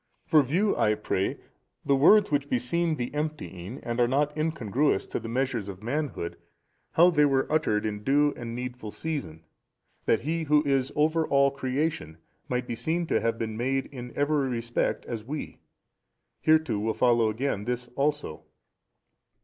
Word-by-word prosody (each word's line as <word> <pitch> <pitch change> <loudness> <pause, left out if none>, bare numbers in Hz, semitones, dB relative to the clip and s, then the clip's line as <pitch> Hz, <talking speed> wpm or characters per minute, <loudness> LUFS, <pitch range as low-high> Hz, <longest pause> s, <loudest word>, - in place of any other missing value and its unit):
For 155 - +5
view 180 +10 +1
I 105 0 +2
pray, 100 -2 -1 0.5
the 140 - +4
words 200 +9 +6
which 145 -1 0
beseem 160 +7 0
the 125 -2 -4
emptying 145 - -4
and 120 +1 -3
are 120 - +4
not 145 +3 +1
incongruous 150 -7 0
to - - -4
the 115 0 -7
measures 120 -4 -1
of 95 - -7
the - - -11
manhood, 135 - -3 0.6
how 175 +2 +6
they 150 -3 +4
were 135 -2 +2
uttered 105 -9 +1
in 105 -1 -3
due 145 +3 +3
and 115 -1 -6
needful 125 -3 -5
season, 105 - -5 0.6
that 115 - +2
He 160 +5 -2
Who 150 0 +4
is 135 -1 +1
over 155 +2 +2
all 140 0 +4
creation 140 - -2 0.3
might 125 0 -1
be 120 - -4
seen 165 +8 -1
to - - +1
have 115 0 0
been 110 -1 -3
made 135 +4 0
in 125 -3 -8
every 145 -2 +1
respect 120 -1 -1
as 115 -3 -5
we. 145 +6 -6 0.8
Hereto 155 -9 +3
will 110 +2 -1
follow 120 -3 +3
again 110 -2 -2
this 125 0 -3
also. 145 - -1
135 Hz, 165 wpm, -27 LUFS, 115-150 Hz, 0.8 s, words